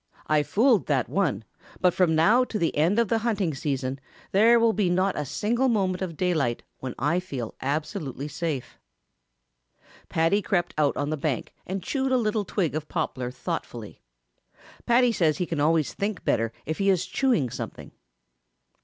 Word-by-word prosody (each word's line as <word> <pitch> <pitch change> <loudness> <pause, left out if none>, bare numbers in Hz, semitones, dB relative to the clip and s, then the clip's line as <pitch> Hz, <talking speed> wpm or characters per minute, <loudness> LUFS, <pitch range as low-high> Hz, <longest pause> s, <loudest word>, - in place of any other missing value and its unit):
I 155 -1 +3
fooled 210 - +3
that 135 -4 +1
one, 155 - 0 0.4
but 180 -1 +3
from 175 -4 +2
now 215 +11 +5
to 225 - -4
the 170 -5 0
end 165 +8 +2
of 235 -1 +3
the 225 - +2
hunting 210 -8 0
season 135 -1 -2 0.3
there 230 +4 +5
will 230 -1 +3
not 185 -1 +1
be - - -4
a - - -4
single 225 - 0
moment 190 -5 0
of 170 -4 -4
daylight 155 -10 0 0.2
when 130 -1 -5
I 145 +6 +1
will - - 0
feel 135 -11 -6
absolutely 145 0 -3
safe." 150 -4 -4 1.3
Paddy 165 +6 +2
crept 180 -2 0
out 150 -2 +1
on 145 +1 -1
the 155 - -1
bank 140 -3 -2
and 190 0 -3
chewed 265 +3 -1
a 260 - +4
little 215 -3 0
twig 180 -6 -1
of 155 0 -4
poplar 125 -2 -2
thoughtfully. 125 - -6 0.9
Paddy 240 0 +4
says 160 -8 +2
he 180 - -1
can 165 -3 -3
always 155 0 +2
think 200 -1 -3
better 115 -1 +1
if 160 +2 -3
he 200 0 +2
is 185 -2 +2
chewing 240 - +1
something. 120 -2 -7
170 Hz, 175 wpm, -26 LUFS, 145-210 Hz, 1.3 s, now